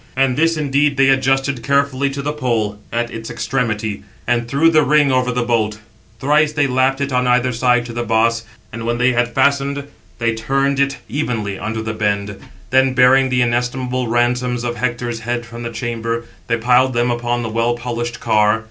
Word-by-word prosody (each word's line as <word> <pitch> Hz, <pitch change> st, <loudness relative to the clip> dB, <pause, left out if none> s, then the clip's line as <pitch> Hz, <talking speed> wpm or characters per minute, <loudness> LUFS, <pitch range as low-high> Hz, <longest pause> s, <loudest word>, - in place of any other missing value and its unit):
And 130 Hz, -1 st, +2 dB
this 165 Hz, +2 st, +2 dB
indeed 145 Hz, -1 st, +1 dB
they 135 Hz, 0 st, +4 dB
adjusted 135 Hz, 0 st, +1 dB
carefully 140 Hz, +1 st, +1 dB
to 140 Hz, 0 st, -5 dB
the 150 Hz, +1 st, -2 dB
pole 115 Hz, -8 st, -1 dB
at 120 Hz, 0 st, -2 dB
its 115 Hz, 0 st, -7 dB
extremity, 110 Hz, -5 st, -2 dB, 0.2 s
and 120 Hz, 0 st, 0 dB
threw 145 Hz, +6 st, +3 dB
the 155 Hz, -1 st, +5 dB
ring 145 Hz, -1 st, +3 dB
over 130 Hz, -1 st, +1 dB
the 125 Hz, 0 st, -1 dB
bolt. 110 Hz, -3 st, 0 dB, 0.4 s
Thrice 150 Hz, +3 st, +2 dB
they 145 Hz, -1 st, +2 dB
lapped 130 Hz, +1 st, +1 dB
it 140 Hz, -1 st, -2 dB
on 125 Hz, 0 st, +1 dB
either 125 Hz, +1 st, +2 dB
side 125 Hz, 0 st, +2 dB
to 120 Hz, -, -7 dB
the 120 Hz, -, -3 dB
boss; 115 Hz, 0 st, +1 dB, 0.3 s
and 115 Hz, +1 st, -6 dB
when 120 Hz, 0 st, 0 dB
they 125 Hz, +1 st, +3 dB
had 120 Hz, -1 st, 0 dB
fastened, 140 Hz, +1 st, +1 dB, 0.3 s
they 115 Hz, 0 st, 0 dB
turned 135 Hz, +5 st, 0 dB
it 140 Hz, 0 st, +1 dB
evenly 115 Hz, -8 st, -3 dB
under 110 Hz, +1 st, -3 dB
the 110 Hz, 0 st, -3 dB
bend; 100 Hz, -2 st, -2 dB, 0.3 s
then, 130 Hz, 0 st, +3 dB
bearing 130 Hz, +1 st, +5 dB
the 125 Hz, -1 st, +2 dB
inestimable 125 Hz, +1 st, -1 dB
ransoms 120 Hz, +1 st, 0 dB
of 120 Hz, 0 st, -2 dB
Hector's 120 Hz, -1 st, -2 dB
head 120 Hz, +1 st, -3 dB
from 115 Hz, +1 st, -9 dB
the 115 Hz, -, -4 dB
chamber, 115 Hz, -1 st, -3 dB, 0.2 s
they 115 Hz, -, +1 dB
piled 125 Hz, +3 st, +3 dB
them 120 Hz, +1 st, +1 dB
upon 120 Hz, 0 st, -1 dB
the 115 Hz, -, -3 dB
well 115 Hz, +2 st, 0 dB
polished 120 Hz, 0 st, -4 dB
car. 105 Hz, +1 st, +2 dB
125 Hz, 190 wpm, -18 LUFS, 115-135 Hz, 0.4 s, the